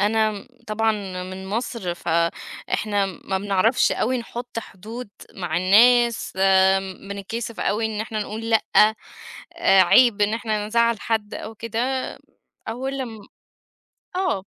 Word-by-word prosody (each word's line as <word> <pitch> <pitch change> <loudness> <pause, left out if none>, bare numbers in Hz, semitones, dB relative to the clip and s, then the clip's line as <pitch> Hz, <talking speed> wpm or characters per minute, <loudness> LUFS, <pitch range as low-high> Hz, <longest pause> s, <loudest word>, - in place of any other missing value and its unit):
أنا 215 0 +1 0.2
طبعًا 220 +1 +1 0.3
من 185 +1 -7
مصر 215 -4 -3
فإحنا 175 +4 -1
ما 190 0 -4
بنعرفش 205 +4 +2
أوي 255 +2 0
نحط 240 0 -6
حدود 225 +3 -8 0.3
مع 175 -4 -3
الناس، 235 +6 +4 0.8
بنتكسف 215 +3 -5
أوي 215 +3 0
إن 215 -1 -4
إحنا 220 -1 -4
نقول 225 +2 -5
لأ، 225 - +4 0.9
آآ، 195 - +5
عيب 215 +4 +5
إن 210 +2 +2
إحنا 215 -3 -2
نزعّل 235 -1 +2
حد 220 -2 -2
أو 220 - -7
كده، 230 +1 -3 0.9
أول 265 +4 -3
لم 230 -5 -5 1.0
آه. 365 - 0
220 Hz, 120 wpm, -23 LUFS, 200-235 Hz, 1.0 s, آآ